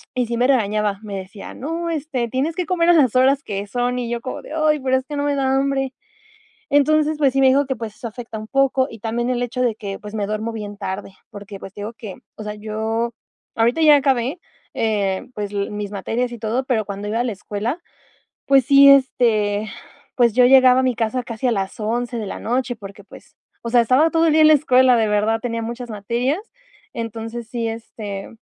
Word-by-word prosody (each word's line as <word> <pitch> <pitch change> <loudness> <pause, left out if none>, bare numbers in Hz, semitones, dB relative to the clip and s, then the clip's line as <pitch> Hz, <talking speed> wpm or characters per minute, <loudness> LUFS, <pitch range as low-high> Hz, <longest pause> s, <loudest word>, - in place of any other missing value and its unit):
y 250 - +1
sí 235 - -2
me 250 - +3
regañaba. 210 -5 +1
Me 200 -2 -5
decía: 190 +2 -9
"No, 330 +5 -4
este, 290 -6 -2
tienes 280 +7 -1
que 360 -2 -2
comer 345 0 +1
a - - +7
las 265 -8 +3
horas 270 +3 +4
que 200 0 -4
son". 245 +3 -1
Y 235 -1 -3
yo 240 - -2
como 255 - -6
de: - - -12
"Ay, 305 -1 +2
pero 260 0 +2
es 260 - -5
que 295 - -6
no 285 - -1
me 290 -1 0
da 265 -1 +1
hambre". 270 -1 0 0.8
Entonces, 305 +1 +3
pues 275 -4 +3
sí, 270 - +1
me 265 - +6
dijo 275 +2 +3
que, 265 - -1
pues 220 -2 -7
eso 235 - -7
afecta 230 -1 -8
un 215 - -8
poco 270 -1 +2
y 225 - -11
también 235 +3 -2
el 245 -1 -1
hecho 245 +1 -3
de 235 -3 +1
que, 200 -3 -6
pues 210 +1 -10
me 205 -2 -1
duermo 215 +2 -3
bien 205 -2 -6
tarde, 195 -1 -6 0.2
porque, 200 -1 -9
pues 190 - -9
te - - -9
digo 220 +3 -6
que, 215 -4 -8 0.2
o 215 - -8
sea, 210 0 -5
yo 220 +2 -2 0.5
ahorita 235 +7 +2
ya 300 -1 +8
acabé, 270 +2 0 0.4
eh, 200 -3 -1
pues 205 -1 -4
l 200 -1 -2
mis 205 -1 -4
materias 225 +5 -2
y 240 - -7
todo, 230 +4 -1
pero 230 -5 0
cuando 200 +1 -6
iba 225 +2 -1
a - - +1
la 235 - -1
escuela, 210 - -4 0.7
pues 275 -1 +5
sí, 280 0 +7
este, 220 -6 +3 0.5
pues, 240 -2 +4
yo 250 0 +5
llegaba 260 0 +6
a - - -2
mi 255 -2 +1
casa 235 +2 -1
casi 230 +1 -6
a 245 - +2
las 195 -3 -2
11 240 +2 -2
de 220 - -3
la - - -6
noche. 245 +1 -1
Porque, 200 -1 -11
pues, - - -16 0.3
o 235 - -3
sea, 240 0 +5
estaba 260 +8 +3
todo 330 0 +3
el - - +4
día 315 - +5
en - - +8
la 310 - +7
escuela, 260 -3 +4
de 220 -1 +2
verdad, 215 +2 +1
tenía 230 -2 -3
muchas 235 +1 -6
materias. 235 - -1 0.5
Entonces, 230 0 -6
sí, 235 -2 -2
este, 220 -3 -7
235 Hz, 230 wpm, -21 LUFS, 215-265 Hz, 0.8 s, ya